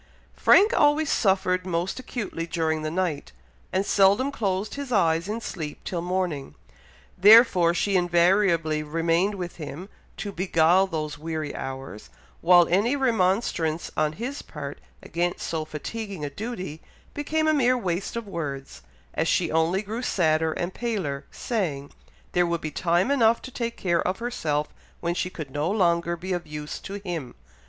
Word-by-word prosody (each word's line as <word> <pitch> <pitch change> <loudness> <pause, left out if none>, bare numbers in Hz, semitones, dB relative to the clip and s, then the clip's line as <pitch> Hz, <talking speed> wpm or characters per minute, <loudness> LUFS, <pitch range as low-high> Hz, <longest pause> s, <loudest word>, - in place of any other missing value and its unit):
Frank 425 +4 +5
always 295 +1 +3
suffered 190 -3 +2
most 180 +4 -2
acutely 205 -10 -4
during 160 -2 -1
the 155 - -2
night, 170 -4 -2 0.4
and 190 +1 0
seldom 200 +9 +4
closed 200 -5 -2
his 280 -2 -6
eyes 170 -5 +2
in 220 +2 -3
sleep 155 -8 -6
till 175 -2 -3
morning, 175 -6 -2 0.6
therefore 200 -4 +7
she 200 +2 +1
invariably 175 -3 +3
remained 165 +6 +1
with 180 -2 -6
him, 155 +4 -7 0.3
to 205 - -4
beguile 180 0 +3
those 155 -4 -4
weary 155 -2 -4
hours, 135 -5 -7 0.3
while 175 0 +6
any 205 +10 +2
remonstrance 190 - 0
on 150 0 +1
his 250 - -5
part 145 -2 -8 0.2
against 175 +1 -2
so 160 -1 -2
fatiguing 190 +2 -5
a 145 - -5
duty, 185 -4 -6 0.3
became 310 +2 0
a 310 - +4
mere 255 -3 +3
waste 185 -3 -2
of 235 -2 -4
words, 140 - -5 0.3
as - - 0
she - - +1
only 165 +5 +1
grew 220 +4 -4
sadder 160 -8 +1
and 175 +2 -3
paler, 190 -13 -3
saying, 155 - -3 0.4
there 175 0 +2
would 170 -1 -1
be 155 - -4
time 175 - +1
enough 230 -4 +4
to 260 - -10
take 235 -1 -4
care 170 -3 +1
of 185 - -1
herself 155 -11 -2 0.3
when 170 0 -1
she 180 +1 -2
could 155 -6 -8
no 150 +4 -1
longer 170 -4 +1
be 185 +2 -4
of 175 -1 -4
use 150 0 -6
to 195 - -7
him. 175 -11 -5
175 Hz, 160 wpm, -25 LUFS, 160-205 Hz, 0.6 s, therefore